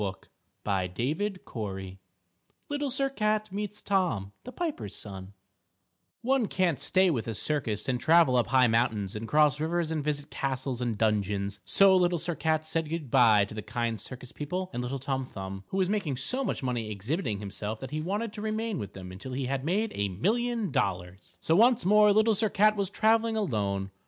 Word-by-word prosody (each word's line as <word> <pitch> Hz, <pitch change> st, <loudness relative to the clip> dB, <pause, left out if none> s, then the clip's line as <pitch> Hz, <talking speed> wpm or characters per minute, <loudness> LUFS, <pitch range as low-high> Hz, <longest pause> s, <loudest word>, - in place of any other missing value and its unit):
LITTLE 95 Hz, -1 st, -3 dB, 0.5 s
SIR 110 Hz, -, -1 dB, 0.2 s
CAT 95 Hz, -4 st, -6 dB, 0.7 s
Little 290 Hz, -1 st, -1 dB
Sir 275 Hz, +2 st, 0 dB
Cat 215 Hz, -5 st, -1 dB
Meets 205 Hz, +1 st, -5 dB
Tom, 170 Hz, -, 0 dB
the 250 Hz, -, -7 dB
Piper's 310 Hz, -, -4 dB
Son 95 Hz, -1 st, -8 dB, 0.9 s
One 260 Hz, -2 st, +2 dB
can't 180 Hz, -7 st, +1 dB
stay 185 Hz, -1 st, +3 dB
with 120 Hz, -7 st, -2 dB
a 115 Hz, -, -3 dB
circus 110 Hz, -7 st, -1 dB
and 125 Hz, -1 st, 0 dB
travel 160 Hz, -1 st, +5 dB
up 120 Hz, -, +3 dB
high 130 Hz, -1 st, +5 dB
mountains 110 Hz, -4 st, +1 dB
and 110 Hz, +1 st, -5 dB
cross 150 Hz, +1 st, +3 dB
rivers 165 Hz, +1 st, -1 dB
and 155 Hz, -2 st, -1 dB
visit 145 Hz, 0 st, -3 dB
castles 130 Hz, -2 st, -2 dB
and 120 Hz, -3 st, -1 dB
dungeons, 100 Hz, -2 st, 0 dB
so 195 Hz, -1 st, +5 dB
Little 180 Hz, -1 st, +3 dB
Sir 170 Hz, +2 st, -2 dB
Cat 155 Hz, -1 st, 0 dB
said 160 Hz, -1 st, -2 dB
good 155 Hz, -6 st, -4 dB
by 110 Hz, -4 st, +6 dB
to 105 Hz, -, -11 dB
the 110 Hz, -, -5 dB
kind 115 Hz, 0 st, -3 dB
circus 125 Hz, +1 st, -9 dB
people 180 Hz, +5 st, -4 dB
and 120 Hz, -, -2 dB
little 125 Hz, +3 st, -3 dB
Tom 135 Hz, 0 st, -2 dB
Thumb, 95 Hz, -4 st, -7 dB
who 190 Hz, -, -4 dB
was 190 Hz, -1 st, +2 dB
making 190 Hz, -10 st, -1 dB
so 250 Hz, -, 0 dB
much 245 Hz, -, -2 dB
money 120 Hz, -4 st, -2 dB
exhibiting 110 Hz, -, -2 dB
himself 105 Hz, +2 st, -5 dB
that 130 Hz, -, -7 dB
he 155 Hz, +1 st, -2 dB
wanted 205 Hz, +6 st, -2 dB
to 210 Hz, -, -7 dB
remain 220 Hz, -2 st, -2 dB
with 100 Hz, -1 st, -6 dB
them 90 Hz, -1 st, -9 dB
until 100 Hz, +8 st, -8 dB
he 130 Hz, +1 st, -2 dB
had 135 Hz, +1 st, -2 dB
made 205 Hz, +8 st, 0 dB
a 100 Hz, 0 st, -1 dB
million 225 Hz, -, 0 dB
dollars. 90 Hz, -1 st, -3 dB
So 160 Hz, -, +2 dB
once 235 Hz, +3 st, +4 dB
more 210 Hz, +2 st, +6 dB
Little 215 Hz, +2 st, +4 dB
Sir 215 Hz, +1 st, +1 dB
Cat 215 Hz, +2 st, +4 dB
was 200 Hz, -3 st, -1 dB
traveling 225 Hz, +2 st, +2 dB
alone. 100 Hz, -, -1 dB
140 Hz, 190 wpm, -28 LUFS, -, 0.9 s, by